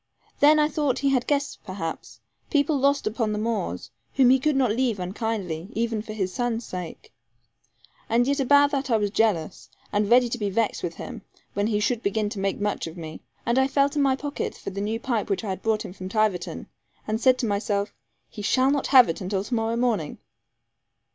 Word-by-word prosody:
Then 300 +2 +6
I 300 0 +4
thought 290 -4 0
he 280 +1 +1
had 255 -2 +1
guests 280 -1 0
perhaps 185 -4 -6 0.3
people 290 -1 +2
lost 280 +1 +2
upon 215 0 -1
the - - -2
moors 210 - -3 0.2
whom 255 -2 +6
he 265 - +5
could 300 +2 +1
not 260 -5 +2
leave 235 -2 0
unkindly, 185 -2 -3
even 225 -1 -1
for 215 0 -8
his 190 -4 -2
son's 240 -1 -2
sake. 180 -3 -8 1.0
And 235 +2 +3
yet 280 +2 0
about 285 +2 +5
that 275 -2 -2
I 230 - +4
was 205 -2 -1
jealous, 200 -7 0 0.2
and 205 0 +1
ready 245 +1 +6
to 245 - -3
be 205 -2 -1
vexed 215 +2 0
with 170 -1 -4
him, - - -8 0.3
when 205 +1 0
he 210 -2 +1
should 220 +2 0
begin 210 0 0
to 205 - -6
make 195 0 -1
much 205 -4 -2
of 165 +2 -9
me. 160 -2 -8 0.2
And 235 +3 +2
I 265 - +3
felt 280 +1 +1
in 290 - +2
my 270 -1 +3
pocket 285 +1 -4
for - - -6
the 200 +1 -4
new 220 +2 -2
pipe 235 -4 -2
which 195 +2 -1
I 210 - -4
had 190 0 -4
brought 220 -1 0
him - - -8
from 185 -1 -7
Tiverton, 210 -4 -1 0.4
and 215 +2 -1
said 255 0 +5
to 250 - -1
myself, 205 -1 -1 0.3
'He 210 - -9
shall 260 +6 +3
not 285 -1 0
have 255 -3 +7
it 165 - -3
until 190 +1 -2
to 225 - -6
morrow 225 0 0
morning.' 235 -11 0
225 Hz, 215 wpm, -25 LUFS, 200-260 Hz, 1.0 s, have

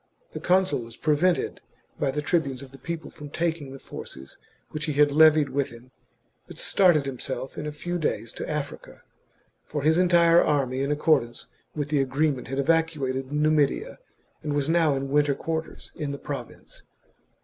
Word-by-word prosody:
The - - -6
consul 185 -5 +2
was 115 0 -10
prevented 160 +4 +1 0.4
by 140 - +1
the 150 +2 -2
tribunes 140 -5 0
of 135 - -12
the 135 - -14
people 165 -2 -6
from 145 -1 -10
taking 160 -3 -2
the 135 - -8
forces 65 - -10 0.3
which 155 0 -4
he 150 - -1
had 145 0 +4
levied 155 -1 +6
with 140 0 -1
him, 120 +1 -14 0.6
but - - -11
started 175 -7 +3
himself 130 0 -5
in 150 - -5
a - - -3
few 175 +4 -4
days 120 -7 -2
to - - -6
Africa, 150 -2 -5 0.6
for 145 -2 -4
his 160 +3 +4
entire 170 -2 +5
army 135 -3 0
in 140 +1 0
accordance 125 -6 +1 0.3
with 145 -1 -2
the 145 -2 +2
agreement 135 0 0
had 135 +1 -4
evacuated 140 -4 0
Numidia 150 -1 +1 0.4
and 150 -1 -3
was 145 -1 0
now 165 -3 +3
in 135 0 -3
winter 145 -1 +3
quarters 160 +1 -5
in 150 -3 -4
the 140 - -4
province. 135 -4 -8
145 Hz, 170 wpm, -26 LUFS, 135-160 Hz, 0.6 s, levied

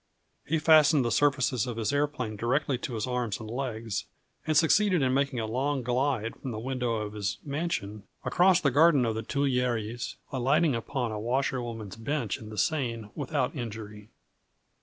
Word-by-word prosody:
He 160 - +1
fastened 155 -3 +5
the 120 - 0
surfaces 130 -5 +2
of 120 -2 -4
his 115 +5 -1
aeroplane 145 -6 -1
directly 125 +4 0
to 125 - -4
his 110 - -1
arms 125 -4 -2
and 110 - -7
legs, 115 -6 -3 0.4
and 155 -2 +3
succeeded 180 +1 +4
in 130 -1 +2
making 140 -2 +1
a 110 - -1
long 130 +4 -1
glide 125 -2 0
from 135 - -6
the 110 - -4
window 125 -1 -1
of 105 -1 -4
his 105 -2 -2
mansion 140 -9 -3 0.2
across 180 0 +4
the 140 - +2
garden 145 -2 +5
of 115 - 0
the 110 - -3
Tuileries, 120 -3 -1 0.2
alighting 140 +4 +2
upon 120 +1 -2
a 105 - -4
washerwoman's 120 -3 -2
bench 115 -2 -2
in 110 - -10
the 110 - -8
Seine 115 -9 -1
without 145 -3 -2
injury. 110 -4 -7
125 Hz, 170 wpm, -28 LUFS, 110-145 Hz, 0.4 s, fastened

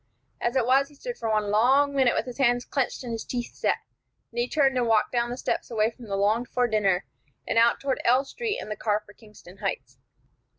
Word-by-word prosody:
As 240 +2 0
it 255 -3 +2
was, 270 +3 +3
he 295 - -19
stood 485 - -7
for 225 - -2
one 210 -1 +1
long 265 +7 +4
minute 265 -3 +3
with - - 0
his 250 +1 -8
hands 245 -2 +2
clenched 270 -1 -2
and 240 - -5
his 225 -1 -4
teeth 240 -1 -4
set; - - 0 0.5
then 235 - -4
he 245 - -1
turned 275 -4 +2
and 245 -2 +1
walked 220 -2 +3
down 240 -1 0
the 245 - -4
steps - - -2
away 220 -1 +1
from 240 0 -13
the 200 -2 -3
longed 215 +5 +1
for 250 -1 +1
dinner, 200 -5 +1 0.4
and 230 - +2
out 235 +1 +4
toward 275 -2 -2
L 255 +3 +3
Street 440 - -3
and 215 - -7
the - - -2
car 210 0 -1
for 205 - -16
Kingston 210 -4 -16
Heights. 130 -10 -4
240 Hz, 240 wpm, -26 LUFS, 215-260 Hz, 0.5 s, long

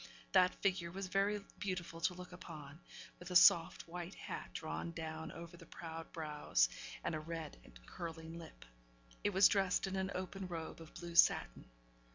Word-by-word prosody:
That 185 -1 +5
figure 185 -3 +2
was 195 +3 -4
very 200 +2 +1 0.2
beautiful 180 -4 -3
to 180 - +2
look 180 0 -9
upon, 155 -4 -9 0.4
with 180 - -8
a 180 - -4
soft, 170 -1 +7
white 175 +2 -6
hat - - -6
drawn 165 +1 -4
down 160 -1 -5
over 170 +1 -9
the 165 - -13
proud 165 -1 -7
brows, 150 - +1 0.3
and - - -1
a 155 - -1
red 160 - -5
and - - -15
curling 165 - -6
lip. 165 -2 -11 0.6
It - - +3
was 195 0 +7
dressed 195 -2 +2
in 190 0 -3
an 190 0 0
open 185 +1 -4
robe 165 -2 -5
of 160 - -12
blue 170 -1 -6
satin. 115 - +4
170 Hz, 175 wpm, -37 LUFS, 160-185 Hz, 0.6 s, soft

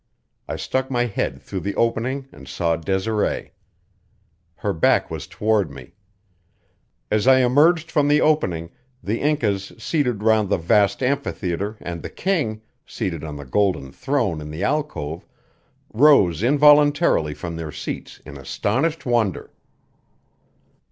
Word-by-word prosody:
I - - -3
stuck 130 0 -2
my 120 -2 +1
head 115 - -3
through 95 - -5
the 100 +2 -4
opening 125 +4 -1
and 70 -2 -14
saw 85 -1 0
Desiree. 95 +6 -1 1.0
Her 100 +2 -2
back 80 - +2
was - - -5
toward 105 -2 0
me. - - -12 1.2
As 110 +3 +1
I 130 0 +6
emerged 155 +6 +3
from 145 -2 +2
the 150 +1 +4
opening 90 - +1 0.3
the 110 +4 -2
Incas 110 -10 0
seated 125 -10 -1
round 110 -2 +3
the - - +2
vast 100 +7 +2
amphitheater 105 -6 -2
and 85 -1 -6
the - - -6
king, 140 - -2 0.2
seated 85 -4 -4
on 75 -2 -6
the 70 -1 -8
golden 85 -3 0
throne 125 - -1
in 75 - -8
the 80 +5 -5
alcove, 85 - -2 0.7
rose 110 - +5
involuntarily 145 - +4
from 85 -1 -6
their 80 -2 -5
seats - - -7
in 70 -1 -9
astonished 130 - -1
wonder. 120 -7 0
110 Hz, 135 wpm, -22 LUFS, 85-135 Hz, 1.2 s, I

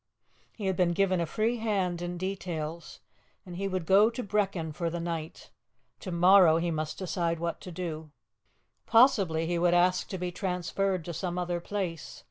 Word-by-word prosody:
He 210 - -6
had 190 -1 +1
been 175 -1 +2
given 185 -1 +1
a 170 - -1
free 225 +8 0
hand 195 -6 -1
in 175 0 -4
details, 170 -4 -5 0.4
and 180 -2 -9
he 195 +2 -2
would 185 -3 -3
go 200 +5 +5
to 245 +2 -5
Brechin 195 -6 -1
for 170 +2 -2
the 170 +1 -4
night; 165 -2 -5 0.5
to 185 - -6
morrow 175 -1 +6
he 170 +1 -1
must 155 -1 -3
decide 170 -2 -1
what 170 0 -3
to 180 - -8
do. 160 -3 -5 0.8
Possibly 195 -10 +4
he 170 +1 -1
would 175 0 +3
ask 180 +1 +2
to 190 - -5
be 180 0 -3
transferred 185 0 -2
to 170 - -5
some 175 +2 -3
other 175 -1 -1
place. 175 -4 -5
175 Hz, 180 wpm, -29 LUFS, 170-195 Hz, 0.8 s, morrow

